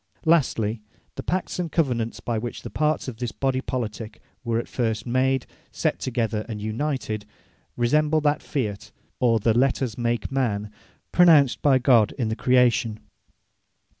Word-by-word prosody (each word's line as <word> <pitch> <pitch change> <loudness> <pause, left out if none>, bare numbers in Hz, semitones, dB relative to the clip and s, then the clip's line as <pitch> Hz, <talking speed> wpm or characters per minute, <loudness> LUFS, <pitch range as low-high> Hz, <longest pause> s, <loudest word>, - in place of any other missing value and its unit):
Lastly, 120 -9 +2 0.3
the - - -6
Pacts 185 0 -2
and 170 -3 -2
Covenants, 120 -8 0
by 115 -2 -2
which 120 +1 -6
the - - -7
parts 155 -1 0
of 125 -4 -6
this 120 -1 -3
Body 135 -1 -1
Politique 115 -4 -5 0.2
were 115 -2 0
at 120 - -3
first 110 -3 -2
made, 130 +1 +1 0.3
set - - -1
together, 115 -4 -1
and 110 -2 -4
united, 110 0 -3 0.5
resemble 150 +6 +2
that 150 0 +1
Fiat, 105 -8 -4 0.3
or 115 -3 +3
the 110 +2 +2
Let 130 +3 +2
Us 125 -4 -3
Make 120 -1 -1
Man, 105 -6 -1 0.4
pronounced 160 -7 +5
by 140 -3 +5
God 120 -4 +4
in 120 -5 -1
the 110 - -1
Creation. 120 -3 +2
120 Hz, 155 wpm, -24 LUFS, 110-135 Hz, 0.5 s, pronounced